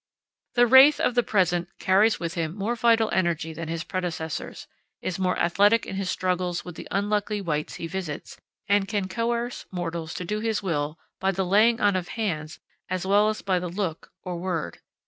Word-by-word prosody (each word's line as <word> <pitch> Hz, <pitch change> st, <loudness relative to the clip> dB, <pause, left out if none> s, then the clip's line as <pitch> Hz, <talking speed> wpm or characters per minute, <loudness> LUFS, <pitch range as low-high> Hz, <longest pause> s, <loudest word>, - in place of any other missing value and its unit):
The 245 Hz, 0 st, +6 dB
wraith 265 Hz, +5 st, +8 dB
of -, -, +2 dB
the 245 Hz, -, +4 dB
present 180 Hz, -5 st, +1 dB
carries 200 Hz, +4 st, +3 dB
with 170 Hz, -1 st, -3 dB
him 165 Hz, -1 st, -2 dB
more 210 Hz, +4 st, -1 dB
vital 230 Hz, -1 st, +3 dB
energy 165 Hz, -3 st, 0 dB
than 165 Hz, 0 st, -6 dB
his 165 Hz, 0 st, -3 dB
predecessors, 170 Hz, -4 st, -4 dB, 0.3 s
is 185 Hz, 0 st, -4 dB
more 180 Hz, -1 st, +1 dB
athletic 205 Hz, +6 st, +3 dB
in -, -, -6 dB
his 195 Hz, -1 st, -2 dB
struggles 180 Hz, -1 st, -1 dB
with 180 Hz, -, -7 dB
the -, -, -9 dB
unlucky 205 Hz, +1 st, 0 dB
wights 155 Hz, -5 st, -2 dB
he -, -, -5 dB
visits, 165 Hz, -4 st, -5 dB, 0.3 s
and 200 Hz, -1 st, +3 dB
can 200 Hz, -2 st, -1 dB
coerce 235 Hz, +4 st, -2 dB
mortals 170 Hz, -3 st, -4 dB
to 180 Hz, -, -4 dB
do 210 Hz, +4 st, -2 dB
his 220 Hz, -2 st, -1 dB
will 150 Hz, -3 st, -2 dB, 0.2 s
by 190 Hz, -, +1 dB
the 190 Hz, 0 st, -1 dB
laying 220 Hz, +5 st, +4 dB
on 205 Hz, -2 st, +3 dB
of 180 Hz, -1 st, -2 dB
hands 160 Hz, -8 st, -3 dB, 0.3 s
as 185 Hz, 0 st, -2 dB
well 205 Hz, +2 st, +4 dB
as 215 Hz, -, -4 dB
by 185 Hz, -2 st, +1 dB
the 180 Hz, 0 st, -4 dB
look 175 Hz, -3 st, -4 dB
or 180 Hz, -1 st, -4 dB
word. 170 Hz, -, -3 dB
185 Hz, 190 wpm, -25 LUFS, 170-210 Hz, 0.3 s, wraith